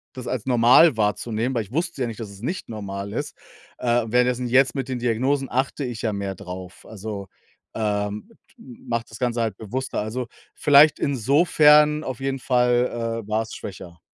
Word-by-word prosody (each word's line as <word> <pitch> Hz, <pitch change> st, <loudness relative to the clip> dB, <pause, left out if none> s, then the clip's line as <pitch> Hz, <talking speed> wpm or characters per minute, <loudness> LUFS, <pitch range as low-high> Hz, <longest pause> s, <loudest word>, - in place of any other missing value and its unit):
das 125 Hz, -, -7 dB
als 130 Hz, -3 st, -3 dB
normal 125 Hz, +4 st, +6 dB
wahrzunehmen, 110 Hz, +4 st, -1 dB
weil 115 Hz, -, 0 dB
ich 100 Hz, -, -17 dB
wusste 165 Hz, -2 st, -2 dB
ja 120 Hz, -, +1 dB
nicht, 115 Hz, 0 st, -7 dB
dass 105 Hz, -, -6 dB
es 100 Hz, +1 st, -13 dB
nicht 175 Hz, +5 st, -4 dB
normal 100 Hz, -2 st, -6 dB
ist. -, -, -4 dB, 0.4 s
Äh, 120 Hz, -1 st, +1 dB
währenddessen 125 Hz, +1 st, +1 dB
jetzt 130 Hz, +1 st, +4 dB
mit 135 Hz, -2 st, -3 dB
den 130 Hz, -1 st, -3 dB
Diagnosen 130 Hz, +4 st, 0 dB
achte 135 Hz, +3 st, -1 dB
ich 120 Hz, -3 st, -5 dB
ja 110 Hz, -2 st, 0 dB
mehr 100 Hz, -1 st, -4 dB
drauf. 90 Hz, +1 st, -9 dB
Also, 105 Hz, -2 st, -7 dB, 0.5 s
ähm, 105 Hz, -1 st, -2 dB, 0.3 s
mache 115 Hz, -2 st, -5 dB
das 110 Hz, -, -11 dB
Ganze 120 Hz, -2 st, 0 dB
halt 110 Hz, -4 st, -2 dB
bewusster. 125 Hz, +5 st, -4 dB
Also, 120 Hz, +3 st, -4 dB, 0.3 s
vielleicht 145 Hz, +1 st, +5 dB
insofern 150 Hz, +3 st, +4 dB
auf 130 Hz, -2 st, -5 dB
jeden 135 Hz, 0 st, -2 dB
Fall, 120 Hz, -2 st, +1 dB
äh, -, -, -17 dB
war 110 Hz, +1 st, 0 dB
es 110 Hz, -, -10 dB
schwächer. 85 Hz, -4 st, -9 dB
120 Hz, 180 wpm, -23 LUFS, 105-130 Hz, 0.5 s, normal